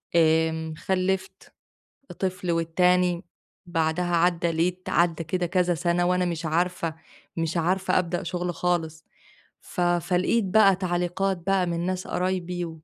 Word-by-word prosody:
آمم 160 -1 +2
خلِّفت 190 +1 -2 0.7
طفل 185 -2 -2
والتاني، 175 +1 +2 0.4
بعدها 170 +1 0
عدّى 170 0 +2
لقيت 180 +3 -1
عدّى 170 -1 +1
كده 175 +2 -1
كذا 180 0 +1
سَنة 175 +1 +1
وأنا 180 0 +2
مش 170 -2 -3
عارفة 170 0 -1 0.4
مش 165 0 -2
عارفة 185 +4 +1
أبدأ 175 0 -2
شُغل 175 0 -3
خالص. 160 -3 -1 0.6
ف - - -7
فلقيت 180 +5 +1
بقى 195 -1 +5
تعليقات 180 +1 -1
بقى 195 -2 +2
من 170 0 -2
ناس 185 0 -2
قرايبي 180 -1 -2
175 Hz, 125 wpm, -25 LUFS, 170-180 Hz, 0.7 s, بقى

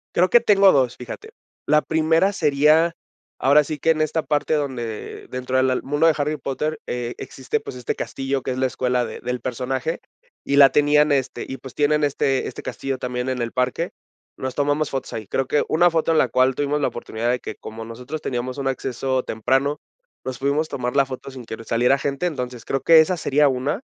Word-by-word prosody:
Creo 180 +2 +4
que 240 - +7
tengo 200 -4 +5
2, 130 -5 +2
fíjate. 415 - -9 0.3
La 150 0 +4
primera 160 +5 +2
sería 155 +1 +3 0.4
ahora 145 +3 +5
sí 150 0 -5
que 165 - 0
en 160 -1 +3
esta 155 +1 0
parte 150 0 0
donde 125 -7 -4
dentro 130 0 -4
de 130 0 +2
al 130 - 0
mundo 145 +3 +1
del 165 - +6
Harry 150 +1 -1
Potter, 150 +3 -3
eh, 120 -1 -4
existe, 135 - -3
pues, 215 - -9
este 125 -2 -3
castillo 135 -1 -3
que - - -2
es 130 - -3
la 130 - +2
escuela 125 -1 0
de - - -8
del 125 0 -3
personaje 130 +5 -3 0.4
y 140 - +1
la 140 -1 +9
tenían 150 +1 +3
este 135 -2 0
y, 135 - -5
pues, 130 -2 -11
tienen 150 +1 +2
este 135 -2 +1
este - - -7
castillo 135 -1 -4
también 125 0 -3
en 130 -1 -2
el 115 -1 -2
parque, 130 +7 -1 0.5
nos 130 -1 -4
tomamos 145 +1 0
fotos 135 -1 -4
ahí. 110 - -5
Creo 130 +6 -1
que 145 - +2
una 175 +3 +4
foto 165 -1 +1
en 160 - +3
la 130 - +3
cual 130 +2 +3
tuvimos 145 +2 -1
la 145 - +1
oportunidad 120 0 -3
de 125 - 0
que, - - -7
como 110 +1 -9
nosotros 125 +7 -7
teníamos 125 -1 -3
un 135 - -2
acceso 130 0 -1
temprano, 135 +6 0 0.4
nos 130 -1 -5
pudimos 140 +4 0
tomar 125 -2 -3
la 140 -1 +4
foto 130 +1 -7
sin 130 -2 -9
que 110 0 -7
saliera 120 +4 +2
gente. 140 +5 -2
Entonces, 125 -7 -5
creo 135 - -1
que 165 +4 +7
esa 175 +3 +3
sería 150 -1 +3
una. 135 - -1
135 Hz, 215 wpm, -22 LUFS, 125-150 Hz, 0.5 s, la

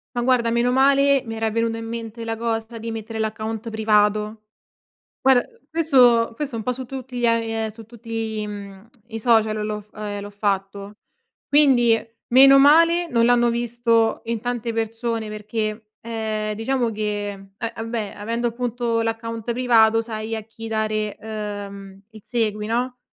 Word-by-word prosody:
Ma 240 - 0
guarda 245 -2 +2
meno 240 +1 +2
male, 275 0 +4
mi 225 0 -5
era 225 0 0
venuto 230 +1 -1
in 225 - -6
mente 230 0 -6
la 225 0 -2
cosa 225 0 -3
di 230 0 -5
mettere 225 0 -6
l'account 220 +1 -3
privato. 215 0 +1 0.8
Guarda 260 -2 +4 0.2
questo 255 -8 +4
questo 285 -1 -4
è - - -3
un 220 - -6
po' 250 - 0
su 255 0 -6
tutti 260 -1 -7
gli 240 - +2
a 230 - +4
ehm, 225 -1 -2
su 220 +1 -12
tutti 225 -2 -5
i 210 - -3
mhmm, 200 0 -9 0.2
i 225 -1 -6
social 220 -2 +2
l'ho 210 0 -3
f 210 +1 -21
ehm, 205 -1 -5
l'ho 205 0 -8
fatto 200 0 -3 0.5
quindi 265 -6 +5 0.4
meno 270 +2 +8
male 330 +5 +5
non 230 -5 +2
l'hanno 240 0 +4
visto 235 -1 +1
in 230 -1 -2
tante 240 -1 -3
persone, 225 0 -2
perché, 215 0 -4
ehm, 220 -2 -3
diciamo 235 +2 0
che 210 -1 -2 0.3
eh 230 +1 -4
vabbè 225 -2 -4
avendo 230 +3 -2
appunto 235 -1 -1
l'account 230 0 -3
privato 225 -2 +4
sai 225 0 -4
a 220 - -3
chi 225 +1 -10
dare, 215 -1 -1
uhm, 205 -2 -7
il 215 -2 -14
segui 215 -3 -1
no, 245 +3 -1
225 Hz, 165 wpm, -22 LUFS, 215-240 Hz, 0.8 s, meno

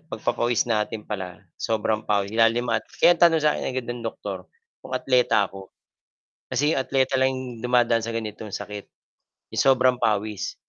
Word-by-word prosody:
pagpapawis 120 -4 -1
natin 105 -1 -1
pala 95 -5 -5 0.2
sobrang 110 -1 -1
pawis 100 0 0
ilalim 115 +2 +3
at 115 - 0 0.2
kaya 175 - +6
ang - - -22
tanong 165 -2 +6
sa 150 -1 +3
akin 130 -2 -4
ng 120 -1 -5
doktor 100 -4 -5 0.4
kung - - -10
atleta 125 -4 +3
ako 95 -1 -11 0.8
kasi 145 +5 +1
yung 135 - +1
atleta 130 0 +1
lang 130 -3 -1
dumadaan 120 -2 +2
sa 115 - -4
ganitong 110 -2 -5
sakit, 105 0 -6 0.7
yung - - 0
sobrang 130 -1 +4
pawis 105 -1 -1
115 Hz, 155 wpm, -24 LUFS, 105-130 Hz, 0.8 s, kaya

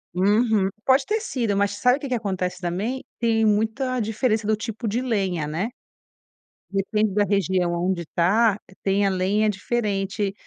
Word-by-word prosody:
Uhum. 205 +1 +3 0.2
Pode 265 +1 +4
ter 435 +1 0
sido, 235 - -1
mas 200 0 +2
sabe, 250 +5 +3
o - - -12
que 280 - -4
que 255 - 0
acontece, 185 -5 -2
também, 195 +9 -3 0.2
tem 225 -1 +2
muita 225 +5 +1
diferença 220 0 0
do 215 - +3
tipo 225 +1 -5
de 225 +4 0
lenha, 195 -10 -1
né, 165 +9 -2 1.0
depende 200 +1 0
da 205 +1 +3
região 185 -3 +1
aonde 175 0 -1
tá, 205 +5 +3 0.2
tem 200 +1 +2
a - - +3
lenha 195 +3 +1
diferente, 205 -1 -1
205 Hz, 160 wpm, -23 LUFS, 190-230 Hz, 1.0 s, Pode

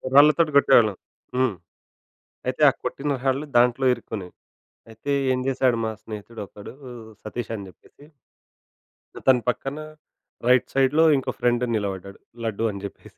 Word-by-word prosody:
రాళ్ళతో 150 +3 +7
కొట్టేవాళ్ళం. 115 -8 +5 0.4
హ్మ్. 130 -5 +1 0.9
అయితే 130 +3 -2
ఆ - - +1
కొట్టిన 145 +1 -2
రాళ్లు 135 +3 0
దాంట్లో 125 +2 +3
ఇరుక్కుని. 110 -6 -7 0.6
అయితే 115 +6 -5 0.2
ఏం 125 - -1
చేసాడు 130 -3 +2
మా 110 - -1
స్నేహితుడు 110 +1 -8
ఒకడు 100 +5 -11 0.5
సతీష్ 115 +1 -5
అని 100 -2 -7
జెప్పేసి 140 +9 -18 1.1
ఆతన 130 -1 +4
పక్కన 135 +4 -3 0.7
రైట్ 125 0 +4
సైడ్‌లో 135 +4 +3
ఇంకో 130 -1 -2
ఫ్రెండ్ 120 0 +2
నిలబడ్డాడు. 100 -2 -4 0.2
లడ్డు 110 0 -1
అని 100 -1 -8
జెప్పేసి. 100 - -10
125 Hz, 130 wpm, -24 LUFS, 110-135 Hz, 1.1 s, రాళ్ళతో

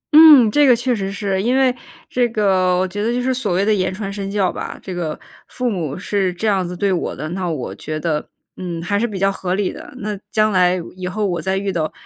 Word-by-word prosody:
嗯， 300 -8 +9
这 290 +3 +4
个 250 - +7
确 240 +1 0
实 195 -1 -3
是。 195 -2 -1
因 245 +5 +1
为 260 -2 +3 0.3
这 245 -1 +1
个 190 -5 +2
我 185 +1 +1
觉 205 +3 -5
得 230 - +1
就 245 - 0
是 260 +1 0
所 220 -8 -1
谓 195 +3 +1
的 215 - +3
言 185 -2 0
传 195 +1 -5
身 195 -1 -4
教 195 -3 +1
吧。 - - -6
这 185 - -6
个 165 -3 -3 0.3
父 250 -1 -2
母 160 -7 -3
是 195 -1 0
这 200 +5 -3
样 195 -3 +2
子 180 0 -6
对 195 0 +1
我 175 - -2
的， 155 - -5
那 180 0 -3
我 150 -6 -4
觉 155 0 -5
得， 155 -2 -2 0.3
嗯， 175 -2 -5
还 205 +2 0
是 235 - +1
比 205 -4 -6
较 195 +1 +2
合 185 -1 -2
理 200 -2 0
的。 - - -11
那 210 -3 -4 0.2
将 215 0 +2
来 180 -1 +3 0.2
以 185 -1 -5
后 205 +3 -2
我 175 -4 -1
再 190 0 -1
遇 195 0 -1
到， 155 -2 -1
195 Hz, 275 characters per minute, -19 LUFS, 180-215 Hz, 0.3 s, 嗯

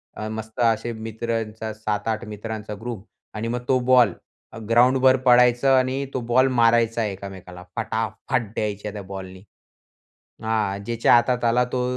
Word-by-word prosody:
अ, 110 - -5
मस्त 110 0 -7
असे 115 0 +1
मित्रांचा 110 0 -4
7-8 110 +1 -3
मित्रांचा 105 0 -6
ग्रुप 115 -4 -6 0.3
आणि 110 +2 -3
मग 120 +1 -2
तो 130 - +3
बॉल 125 -5 +4 0.4
अ, - - -9
ग्राउंडभर 130 +2 +5
पळायचं 125 +1 +5
आणि 130 +2 0
तो - - -1
बॉल 130 +2 +5
मारायचा 115 -1 +3
एकमेकाला, 95 -2 -8
फटाफट 115 +2 -2
द्यायच्या 105 0 -3
त्या 105 - -6
बॉलनी. 95 -1 -9 1.0
हां. 105 -3 -1
ज्याच्या 115 0 +2
हातात 120 +1 +2
आला 120 +2 +3
तो 125 - 0
115 Hz, 140 wpm, -23 LUFS, 105-120 Hz, 1.0 s, ग्राउंडभर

